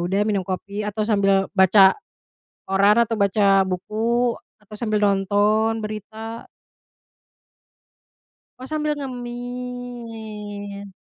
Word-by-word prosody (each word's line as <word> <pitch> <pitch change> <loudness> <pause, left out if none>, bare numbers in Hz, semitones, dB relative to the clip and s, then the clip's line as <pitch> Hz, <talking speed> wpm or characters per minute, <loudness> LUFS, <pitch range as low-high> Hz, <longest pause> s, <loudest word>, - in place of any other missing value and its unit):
udah 190 +4 0
minum 210 -2 0
kopi, 200 +2 -4
atau 210 +1 -2
sambil 195 -3 +3
baca 190 0 +6 0.7
koran, 200 +2 +4
atau 225 0 -3
baca 200 -1 +3
buku, 230 +6 0 0.2
atau 210 0 -14
sambil 215 -1 -1
nonton 205 +3 +2
berita? 220 +2 -7 2.1
Oh, 255 - -8
sambil 305 -1 0
ngemil? 240 -6 -7
210 Hz, 90 wpm, -22 LUFS, 200-230 Hz, 2.1 s, baca